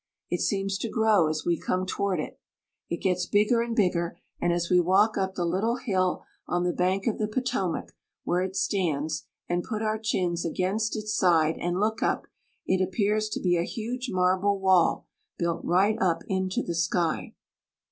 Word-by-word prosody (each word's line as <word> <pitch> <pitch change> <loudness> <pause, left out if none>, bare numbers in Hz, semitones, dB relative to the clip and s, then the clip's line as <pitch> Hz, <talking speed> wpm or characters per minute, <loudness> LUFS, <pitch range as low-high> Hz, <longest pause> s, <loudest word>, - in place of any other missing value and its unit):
It - - 0
seems 195 -1 0
to 230 - -3
grow 215 -7 +3
as 155 0 -3
we 170 -2 +1
come 185 0 -1
toward 195 -1 -1
it. - - -6 0.5
It 170 - -4
gets 180 -2 +1
bigger 210 +3 +3
and 235 -1 -2
bigger, 180 -5 +1 0.2
and 175 - +2
as 170 0 0
we 180 0 +4
walk 195 +5 +3
up 190 -1 -1
the 175 - -1
lit 180 +3 0
tle 230 +2 +1
hill 185 -7 0 0.2
on 175 0 0
the 175 -1 0
bank 185 +2 0
of 230 - 0
the 215 - 0
Potomac 215 -6 -2 0.3
where 175 +1 +1
it 190 0 -3
stands, 160 -6 -1 0.2
and 175 0 0
put 220 -2 -3
our 215 0 0
chins 180 -6 -1
against 190 +6 -1
its 215 0 -2
side, 165 -4 +3
and 175 +1 -1
look 215 +1 0
up, - - 0 0.4
it 185 0 +1
appears 210 +3 +1
to - - -3
be 175 -2 +2
a 170 - +1
huge 245 +6 -4
marble 185 +1 +2
wall 190 -3 +3 0.3
built 170 -1 -1
right 200 +5 +2
up 180 -3 +1
into^ 190 -1 -1
the 170 - -2
sky. 170 0 0
190 Hz, 190 wpm, -27 LUFS, 175-215 Hz, 0.5 s, we